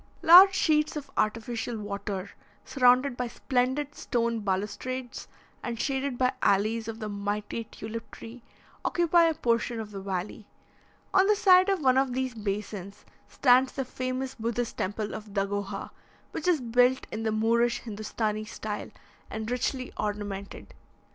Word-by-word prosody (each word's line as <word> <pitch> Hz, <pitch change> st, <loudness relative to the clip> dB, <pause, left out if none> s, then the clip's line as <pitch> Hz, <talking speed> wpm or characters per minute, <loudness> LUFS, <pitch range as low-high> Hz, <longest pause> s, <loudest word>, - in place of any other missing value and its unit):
Large 375 Hz, +4 st, +9 dB
sheets 305 Hz, -3 st, +2 dB
of 290 Hz, -2 st, -6 dB
artificial 230 Hz, +2 st, -1 dB
water, 200 Hz, -2 st, -5 dB, 0.3 s
surrounded 255 Hz, 0 st, +3 dB
by 245 Hz, 0 st, -2 dB
splendid 260 Hz, +4 st, -1 dB
stone 235 Hz, -4 st, -1 dB
balustrades, 210 Hz, +6 st, -3 dB, 0.3 s
and 235 Hz, -2 st, -4 dB
shaded 270 Hz, -1 st, -1 dB
by 255 Hz, +1 st, +2 dB
alleys 215 Hz, +3 st, +2 dB
of 225 Hz, -1 st, -5 dB
the 215 Hz, -2 st, -5 dB
mighty 205 Hz, +2 st, -3 dB
tulip 225 Hz, +1 st, -8 dB
tree, 235 Hz, +2 st, -11 dB, 0.4 s
occupy 345 Hz, -1 st, +3 dB
a 325 Hz, -1 st, +2 dB
portion 235 Hz, -1 st, 0 dB
of 215 Hz, -1 st, -6 dB
the 195 Hz, -1 st, -6 dB
valley. 195 Hz, +2 st, -4 dB, 0.7 s
On 385 Hz, 0 st, +5 dB
the 425 Hz, -, +4 dB
side 375 Hz, -2 st, +6 dB
of 385 Hz, -4 st, +1 dB
one 260 Hz, 0 st, +5 dB
of 265 Hz, -2 st, 0 dB
these 260 Hz, 0 st, -2 dB
basins, 205 Hz, -2 st, -5 dB, 0.2 s
stands 255 Hz, 0 st, +4 dB
the 270 Hz, -, -3 dB
famous 255 Hz, +1 st, -3 dB
Buddhist 235 Hz, -1 st, -3 dB
temple 205 Hz, +2 st, -3 dB
of 210 Hz, -1 st, -8 dB
Dagoha, 200 Hz, 0 st, -2 dB, 0.4 s
which 320 Hz, -, -4 dB
is 340 Hz, -6 st, +3 dB
built 245 Hz, +2 st, +3 dB
in 215 Hz, -, -4 dB
the 220 Hz, -1 st, 0 dB
Moorish 230 Hz, +2 st, +1 dB
Hindostanee 215 Hz, -1 st, -3 dB
style, 210 Hz, 0 st, -5 dB, 0.4 s
and 220 Hz, +1 st, -5 dB
richly 255 Hz, +1 st, -2 dB
ornamented. 205 Hz, -1 st, -5 dB
235 Hz, 145 wpm, -28 LUFS, 210-260 Hz, 0.7 s, Large